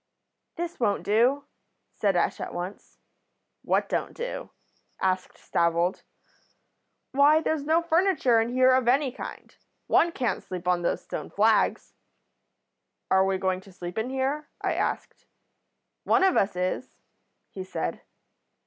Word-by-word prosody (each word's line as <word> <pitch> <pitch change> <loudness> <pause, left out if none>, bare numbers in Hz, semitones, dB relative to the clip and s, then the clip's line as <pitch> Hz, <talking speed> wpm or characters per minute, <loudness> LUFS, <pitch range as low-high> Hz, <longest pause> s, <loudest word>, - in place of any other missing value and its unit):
"'This 345 0 -5
won't 205 -4 +1
do,' 240 +7 +2 0.5
said 200 -3 +1
Ash 175 - +1
at - - -5
once. 180 +3 -7 0.6
"'What - - +1
don't - - -2
do?' - - -5 0.5
asked 185 -1 -1
Stavold. 170 +2 0 1.1
"'Why, 285 +3 +5
there's 315 -2 -1
no 325 +2 +3
furniture 335 -9 +3
in 225 - -1
here 255 +1 +4
of 255 -2 +2
any 265 +2 +3
kind. - - -9 0.3
One 340 - +3
can't 250 -7 -1
sleep 180 -1 -7
on 180 -1 +2
these 170 - -1
stone - - -6
flags.' - - +2 1.2
"'Are 190 0 +5
we 190 0 +1
going 185 0 -1
to 195 - -16
sleep 175 +2 -6
in 225 +3 -2
here?' 270 +3 -2
I - - -1
asked. - - -3 0.8
"'One 390 - +3
of 380 -1 +4
us 195 -1 +2
is,' 185 +8 -3 0.5
he 190 - -6
said. 85 - -4
230 Hz, 140 wpm, -26 LUFS, 185-285 Hz, 1.2 s, Why